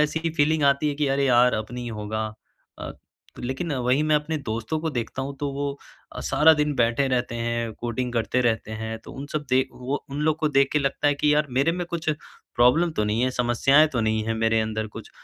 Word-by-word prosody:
ऐसी 160 +2 0
फ़ीलिंग 155 0 +2
आती 140 +2 +3
है 145 - -1
कि 150 0 0
अरे 140 +1 +1
यार! 125 -1 +4
अब 110 0 -2
नहीं 120 -1 -5
होगा 110 0 -3 0.5
अ, - - -6 0.5
लेकिन 135 +7 -3
वही 130 +2 +1
मैं 155 0 +3
अपने 150 +2 -2
दोस्तों 115 +4 -3
को 160 0 -2
देखता 125 0 -4
हूँ 140 +1 -5
तो 145 -1 -1
वो 140 +1 -2 0.4
अ, - - -6
सारा 160 +2 +5
दिन 150 -1 0
बैठे 120 +3 +2
रहते 125 -2 -1
हैं, 115 -1 -2
कोडिंग 120 +2 -3
करते 120 +2 0
रहते 115 -3 0
हैं। 110 +1 -5
तो - - -10
उन 140 +2 -7
सब 150 -1 -2
देख 130 +1 +3
वो 130 +3 -4
उन 140 +2 -4
लोग 155 0 +1
को 155 - +1
देख 140 -2 +3
के 150 - +3
लगता 140 +1 -1
है 145 - +2
कि 150 +1 +2
यार, 150 0 +2
मेरे 135 +6 +2
में 175 0 -3
कुछ 165 -2 -2 0.4
प्रॉब्लम 140 +9 +4
तो 105 - 0
नहीं 105 +3 0
है, 130 - +2
समस्याएँ 130 +5 +4
तो 125 - 0
नहीं 110 0 +1
हैं 115 +1 -1
मेरे 115 0 +2
अंदर 110 0 -2
कुछ। 105 - -11
130 Hz, 230 wpm, -24 LUFS, 115-150 Hz, 0.5 s, सारा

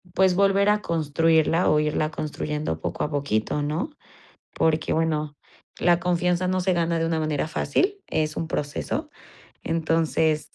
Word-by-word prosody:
pues 190 -1 +4
volver 200 +1 +3
a 210 0 +2
construirla 165 +1 +2
o 150 - +4
irla 150 0 0
construyendo 150 - -3
poco 90 0 -3
a - - -1
poquito, 140 -2 -1
¿no?, 155 - -2 0.7
porque 160 -1 +1
bueno, 155 -2 0 0.5
la 175 -1 +4
confianza 180 0 +1
no 185 0 +1
se 185 0 +1
gana 170 -1 0
de 165 - 0
una 165 -1 0
manera 155 -1 -1
fácil, 395 - 0
es 155 0 -1
un 165 - -2
proceso. 165 - -3 0.6
Entonces, 160 -1 0
160 Hz, 150 wpm, -24 LUFS, 150-180 Hz, 0.7 s, pues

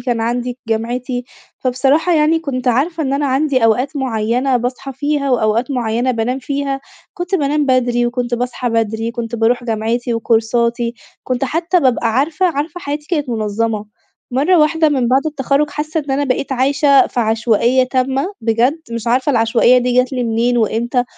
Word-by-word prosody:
كان 240 -3 -1
عندي 240 +2 -2
جامعتي. 245 +3 -2 0.3
فبصراحة 270 +7 +1
يعني 310 +1 +3
كنت 265 -5 -3
عارفة 310 +7 0
إن 270 -2 -1
أنا 285 +1 0
عندي 265 -2 +1
أوقات 250 +6 +1
معيّنة 250 0 0
باصحى 250 +3 -4
فيها 285 +1 -1
وأوقات 230 +1 +1
معيّنة 240 -1 0
بانام 245 +2 -1
فيها. 275 +1 -3 0.3
كنت 350 +1 -3
بانام 295 -3 +1
بدري 245 -2 +2
وكنت 240 0 -2
باصحى 245 +1 -2
بدري، 225 0 -1
كنت 235 -1 -5
باروح 235 +2 +1
جامعتي 230 +1 -1
وكورساتي 235 +1 0 0.3
كنت 255 +1 -1
حتّى 335 +6 0
بابقى 255 -4 +1
عارفة 305 +8 +1
عارفة 330 +2 -3
حياتي 295 -1 -5
كانت 295 -6 -1
منظمة. 215 -1 -2 0.5
مرّة 300 +8 +3
واحدة 315 +1 +3
مِن 260 -5 0
بعد 265 +5 +2
التخرج 290 0 0
حاسّة 310 +2 -2
إن 285 -2 -7
أنا 275 +2 +1
بقيت 270 +1 -1
عايشة 275 +1 +3
في 245 - -2
عشوائية 230 +3 +2
تامة، 265 +6 -1
بجد، 235 +7 +1
مش 230 -1 -5
عارفة 255 +4 +2
العشوائية 235 +1 +4
دي 250 0 0
جات 255 +1 +2
لي 250 -1 -1
منين 235 +2 +1
وإمتى 235 +3 0
255 Hz, 165 wpm, -17 LUFS, 235-280 Hz, 0.5 s, العشوائية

